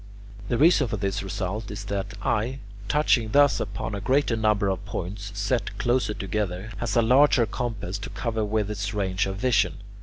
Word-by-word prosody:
The 120 - +1
reason 155 -2 +5
for 110 - -3
this 95 0 -1
result 100 +2 -4
is 100 -1 -6
that 100 0 -3
the 100 -2 -7
eye, 120 +5 0 0.3
touching 120 -5 +2
thus 145 0 +5
upon 105 +1 -4
a 100 - -4
greater 130 +1 +2
number 105 -2 +2
of 95 0 -1
points, 100 +1 -5
set 105 +2 -1
closer 120 -3 +1
together, 95 0 -3
has - - -2
a 115 - +4
larger 130 +1 +5
compass 105 -3 -4
to - - -6
cover 110 -2 -2
with 105 0 -1
its 100 -1 -3
range 95 -2 0
of 95 - -3
vision. 125 +2 +2
105 Hz, 185 wpm, -25 LUFS, 100-120 Hz, 0.3 s, reason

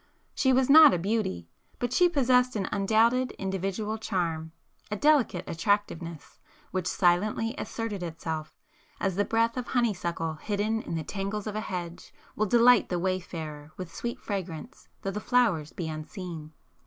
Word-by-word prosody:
She 265 - +2
was 260 0 +3
not 305 -2 +9
a - - 0
beauty; 185 - -1 0.3
but 245 0 -2
she 355 +5 +5
possessed 255 -5 +3
an 195 -3 -1
undoubted 225 +5 +2
individual 195 +3 -3
charm,—a 170 -1 -4
delicate 275 - +3
attractiveness, 170 -3 -2 0.3
which 185 -1 -2
silently 210 +5 +2
asserted 225 -8 -4
itself, 160 -2 -5 0.4
as 195 -3 0
the 205 - +2
breath 230 +1 +1
of 250 - -3
honeysuckle 175 -9 -1
hidden 215 +2 -1
in 170 - -5
the 160 - -2
tangles 200 +3 -4
of 210 -1 -4
a 215 - -1
hedge, 175 -4 -6 0.2
will 215 - +1
delight 240 +2 +5
the 180 - 0
wayfarer 160 -5 -4
with 180 -3 -7
sweet 235 0 -4
fragrance 195 - -6 0.2
though 195 - -1
the 205 - -4
flowers 210 - +2
be 170 - -5
unseen. 155 0 -7
195 Hz, 150 wpm, -28 LUFS, 170-230 Hz, 0.4 s, not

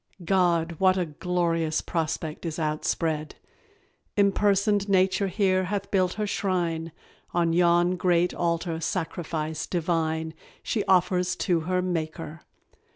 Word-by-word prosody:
God, 170 -3 +2
what 185 0 +4
a 180 - +1
glorious 165 0 -1
prospect 160 -2 -3
is 165 -3 -4
outspread! 155 0 -1 0.8
Impersoned 200 0 +2
nature 190 +1 +3
here 185 -1 +1
hath 200 +1 -3
built 185 -2 +2
her 215 - -2
shrine: 175 -5 -1 0.4
On 170 -1 +2
yon 175 +1 +3
great 180 -1 +2
altar 170 -1 -1
sacrifice 160 -2 -3
divine 160 -2 -1 0.3
She 210 - -1
offers 180 -1 +2
to 175 -3 +2
her 180 0 +1
Maker. 165 -2 -4
175 Hz, 115 wpm, -26 LUFS, 165-185 Hz, 0.8 s, what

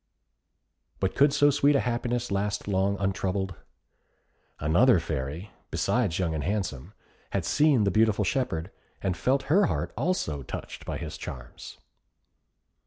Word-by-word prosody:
But 95 - 0
could 140 +1 +4
so 145 0 +4
sweet 145 +1 +3
a - - +4
happiness 120 -1 -1
last 100 +1 -1
long 100 0 +1
untroubled? 95 0 -1 1.1
Another 90 - +4
Fairy, 80 +4 -4 0.2
besides 110 -9 0
Young 85 -3 0
and 75 - -2
Handsome, 95 -10 -3 0.4
had - - 0
seen 145 -6 +4
the 100 - +2
beautiful 110 0 +3
shepherd, 95 - -1 0.3
and 95 -2 0
felt 130 +10 +1
her 190 +5 +4
heart - - -2
also 120 - -1
touched 65 - -7
by - - -2
his - - -6
charms. 65 -1 -9
100 Hz, 135 wpm, -27 LUFS, 85-125 Hz, 1.1 s, could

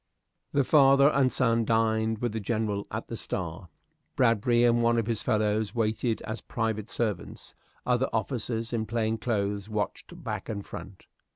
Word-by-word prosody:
The 140 - +3
father 140 0 +6
and 135 -3 +2
son 115 -2 +2
dined 110 0 +1
with 120 - +1
the 110 - -3
General 105 -1 -2
at - - -4
the - - -6
"Star." 90 0 -4 0.5
Bradbury 120 0 +3
and 120 0 +4
one 115 0 +3
of 115 - +1
his 115 -2 -1
fellows 105 +1 0
waited 110 0 0
as 110 +2 -5
private 110 -2 -2
servants; 110 -4 -3 0.3
other 125 +1 +1
officers, 115 0 -2
in 110 -2 -1
plain 115 -1 -1
clothes, 100 -3 -1
watched 105 -3 -4
back - - -4
and 100 -2 -4
front. 95 +2 -10
110 Hz, 160 wpm, -28 LUFS, 105-120 Hz, 0.5 s, father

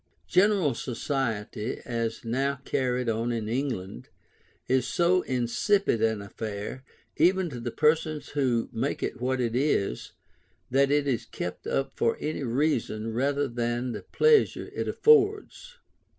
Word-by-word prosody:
General 185 - +3
society, 115 -3 -3
as 115 -2 -3
now 135 +4 -1
carried 125 -1 0
on 115 +1 0
in 115 -2 -2
England, 115 - -3 0.6
is 130 -1 +2
so 180 +1 +3
insipid 130 - +1
an 110 -2 +1
affair, 105 +4 -6 0.3
even 180 +1 +3
to 125 - -6
the 120 +1 -3
persons 155 +2 +1
who 130 -5 0
make - - -2
it - - -3
what 130 +1 0
it 120 -2 -1
is, 120 -5 0 0.6
that 135 +1 +4
it 145 0 +2
is 125 -5 -1
kept - - -6
up 135 - -1
for 115 - +1
any 155 0 -3
reason 115 -4 -1
rather 140 +4 +1
than 120 0 -2
the - - -5
pleasure 460 -1 +2
it - - -3
affords. 440 +3 +2
130 Hz, 135 wpm, -27 LUFS, 115-150 Hz, 0.6 s, that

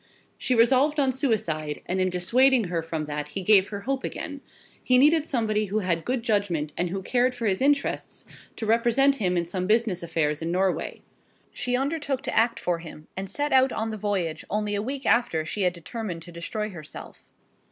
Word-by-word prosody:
She 255 - 0
resolved 265 +6 +4
on 270 -2 +3
suicide, 170 - -1
and 185 +1 -1
in 185 - +2
dissuading 235 +5 +3
her 170 -1 -1
from 160 -1 -4
that 150 0 -4
he 185 +6 -5
gave 200 0 +5
her 200 -1 -6
hope 270 +4 -2
again. 285 -2 -5 0.4
He 255 - +4
needed 300 +3 +4
somebody 215 -4 0
who 205 +2 -2
had 175 -5 0
good 250 -1 -1
judgment, 185 -9 0
and 175 0 -1
who 190 +2 -4
cared 250 +4 +1
for 240 -2 -4
his 195 0 +1
interests, 280 +1 0 0.3
to 225 - -4
represent 240 +5 +3
him 180 -6 0
in 170 - 0
some 180 +1 -3
business 215 -4 +2
affairs 160 -3 -1
in 165 +1 -2
Norway. 185 +1 -1 0.5
She 250 0 -1
undertook 280 -1 -2
to - - -3
act 230 +1 +2
for 175 -1 -1
him, 155 -2 -11
and 190 0 -5
set 290 +6 -2
out 260 0 +5
on 220 0 -2
the - - -4
voyage 195 -6 -2
only 210 0 -1
a 205 - 0
week 265 +4 -4
after 165 -10 +2
she 205 - -3
had 180 -2 +2
determined 175 -1 -6
to 175 - -11
destroy 210 +6 -4
herself. 155 -5 -10
210 Hz, 200 wpm, -26 LUFS, 175-255 Hz, 0.5 s, gave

